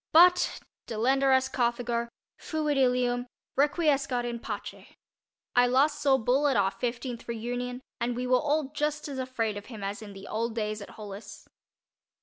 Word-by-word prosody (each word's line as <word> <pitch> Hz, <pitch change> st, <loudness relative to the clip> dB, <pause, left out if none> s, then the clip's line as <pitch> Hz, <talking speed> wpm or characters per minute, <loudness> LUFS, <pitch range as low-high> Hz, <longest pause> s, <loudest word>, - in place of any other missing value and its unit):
But 355 Hz, +2 st, +6 dB, 0.3 s
Delenda 265 Hz, +5 st, +2 dB
est 260 Hz, -, -2 dB
Carthago—fuit 240 Hz, +5 st, -2 dB
Ilium—Requiescat 255 Hz, +2 st, +1 dB
in 235 Hz, -1 st, -3 dB
pace. -, -, -6 dB, 0.7 s
I 245 Hz, 0 st, +6 dB
last 285 Hz, +4 st, +3 dB
saw 275 Hz, -2 st, +5 dB
"Bull" 265 Hz, +4 st, +2 dB
at 270 Hz, -5 st, +2 dB
our 195 Hz, -1 st, +3 dB
fifteenth 240 Hz, +1 st, -4 dB
reunion 245 Hz, +2 st, -3 dB, 0.2 s
and 240 Hz, 0 st, -1 dB
we 250 Hz, +1 st, -2 dB
were 250 Hz, 0 st, +4 dB
all 295 Hz, -1 st, 0 dB
just 300 Hz, +1 st, -1 dB
as 275 Hz, -2 st, -5 dB
afraid 230 Hz, -5 st, -1 dB
of 205 Hz, -, -8 dB
him 220 Hz, -5 st, -8 dB
as 200 Hz, +1 st, -3 dB
in 205 Hz, -2 st, -9 dB
the 195 Hz, 0 st, -10 dB
old 230 Hz, +1 st, -2 dB
days 215 Hz, -1 st, -2 dB
at 200 Hz, -, -8 dB
Hollis. 205 Hz, 0 st, -9 dB
245 Hz, 150 wpm, -28 LUFS, 230-275 Hz, 0.7 s, But